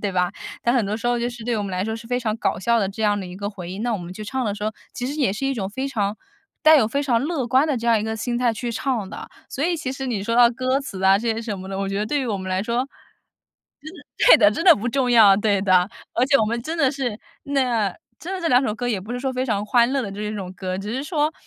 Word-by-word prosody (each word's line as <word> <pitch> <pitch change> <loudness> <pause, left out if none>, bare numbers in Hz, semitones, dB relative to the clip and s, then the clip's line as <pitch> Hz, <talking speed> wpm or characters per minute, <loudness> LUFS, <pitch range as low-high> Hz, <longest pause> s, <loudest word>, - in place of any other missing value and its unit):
对 200 -2 -2
吧？ 180 -1 +1 0.3
但 235 - +2
很 240 -5 +2
多 205 +2 -2
时 235 +2 -2
候 240 0 +1
就 235 +1 -1
是 235 -2 -9
对 235 -1 -1
我 205 - -2
们 195 - -5
来 185 +1 -1
说 220 +1 -3
是 230 0 -11
非 245 +1 -1
常 220 -3 -1
搞 - - -1
笑 235 +4 +2
的 195 - 0
这 205 +3 -6
样 205 -1 +2
的 190 - -5
一 180 - -9
个 200 +2 -4
回 185 -4 -8
应。 190 +4 -5
那 240 0 0
我 210 - -1
们 175 +1 -8
去 215 - -7
唱 255 +5 -3
的 205 -3 -1
时 205 - -9
候， 215 +1 -1 0.2
其 245 - -5
实 275 +4 -3
也 270 -10 +1
是 220 +7 -4
一 270 - +1
种 205 -7 -3
非 260 +7 -4
常 210 -5 -1 0.5
带 310 0 +8
有 260 - +4
非 280 +6 -1
常 245 -5 +2
乐 290 -4 -2
观 260 +5 +3
的 300 - 0
这 235 0 -4
样 230 -1 +4
一 - - -3
个 220 0 -2
心 240 +3 -2
态 245 -1 +2
去 235 +2 -4
唱 225 -2 -2
的。 - - -8 0.2
所 280 - -3
以 345 0 +1
其 305 -5 -4
实 270 0 -5
你 220 -6 -2
说 230 +3 -1
到 240 -1 +7
歌 255 +3 0
词 195 -9 -7
啊， 190 +1 +5
这 230 +1 0
些 225 - -4
什 210 -4 -4
么 190 +1 -8
的， 195 - -4
我 195 - -2
觉 195 0 -2
得 210 - -1
对 290 +4 0
于 260 - -2
我 215 -4 -1
们 190 0 -6
来 185 +1 0
说， 235 +4 -1 0.9
真 310 +2 -9
的 - - -14 0.2
对 - - +10
的， 205 -3 +6
真 330 - -3
的 345 - +9
不 225 +4 -3
重 255 0 0
要， 215 -5 +7
对 205 -1 +1
的。 185 -2 +4 0.3
而 245 - +3
且 275 0 +5
我 220 - +3
们 235 +2 -2
真 320 +6 -4
的 275 -4 +4
是 250 -7 -3 0.3
那 245 -8 +1 0.3
真 355 - -6
的 375 - -4
这 340 - -2
两 250 -2 +4
首 220 - 0
歌 245 +2 -4
也 215 -5 -1
不 210 +6 -7
是 245 - -3
说 265 0 -2
非 255 0 -1
常 210 -4 -1
欢 235 +2 +3
乐 275 - +1
的 200 -4 -5
这 205 +2 -6
一 210 0 -3
种 190 -3 -6
歌， 185 0 -4
只 205 +3 -5
是 260 +3 -2
说， 305 -1 0
230 Hz, 345 characters per minute, -22 LUFS, 205-260 Hz, 0.9 s, 对